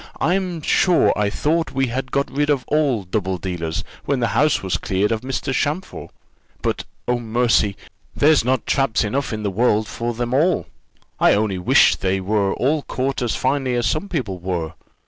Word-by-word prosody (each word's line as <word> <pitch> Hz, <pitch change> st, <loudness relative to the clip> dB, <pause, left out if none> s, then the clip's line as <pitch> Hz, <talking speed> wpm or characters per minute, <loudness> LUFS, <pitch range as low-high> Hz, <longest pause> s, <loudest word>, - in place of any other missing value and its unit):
I'm 180 Hz, -2 st, 0 dB
sure 180 Hz, +2 st, +3 dB
I 105 Hz, -1 st, +1 dB
thought 160 Hz, +9 st, -1 dB
we 135 Hz, 0 st, +1 dB
had 130 Hz, +1 st, -4 dB
got 140 Hz, 0 st, 0 dB
rid 145 Hz, +2 st, 0 dB
of 140 Hz, -4 st, +1 dB
all 145 Hz, -8 st, +1 dB
double 95 Hz, 0 st, -2 dB
dealers, 90 Hz, +1 st, -4 dB, 0.2 s
when 140 Hz, -2 st, 0 dB
the 120 Hz, -2 st, +1 dB
house 150 Hz, -5 st, +2 dB
was 95 Hz, -, 0 dB
cleared 100 Hz, +3 st, 0 dB
of 110 Hz, -1 st, -1 dB
Mr. 135 Hz, +1 st, -3 dB
Champfort; 150 Hz, +8 st, -2 dB, 0.5 s
but, -, -, -1 dB, 0.2 s
oh, 125 Hz, 0 st, +1 dB
mercy! 115 Hz, -3 st, +1 dB, 0.4 s
there's 150 Hz, -2 st, +4 dB
not 130 Hz, 0 st, 0 dB
traps 135 Hz, -5 st, +1 dB
enough 130 Hz, +6 st, -2 dB
in 110 Hz, -1 st, -4 dB
the 100 Hz, -, -1 dB
world 110 Hz, +1 st, +2 dB
for 120 Hz, +2 st, -4 dB
them 120 Hz, +1 st, -2 dB
all; 165 Hz, +7 st, +2 dB, 0.5 s
I -, -, +5 dB
only 100 Hz, -3 st, 0 dB
wish 90 Hz, -, +4 dB
they 95 Hz, 0 st, 0 dB
were 100 Hz, 0 st, 0 dB
all 145 Hz, +4 st, +1 dB
caught 135 Hz, 0 st, -3 dB
as 120 Hz, -2 st, 0 dB
finely 130 Hz, -1 st, 0 dB
as 120 Hz, -1 st, 0 dB
some 155 Hz, -, -1 dB
people 110 Hz, -, -3 dB
were. 85 Hz, -3 st, -3 dB
120 Hz, 185 wpm, -21 LUFS, 100-140 Hz, 0.5 s, I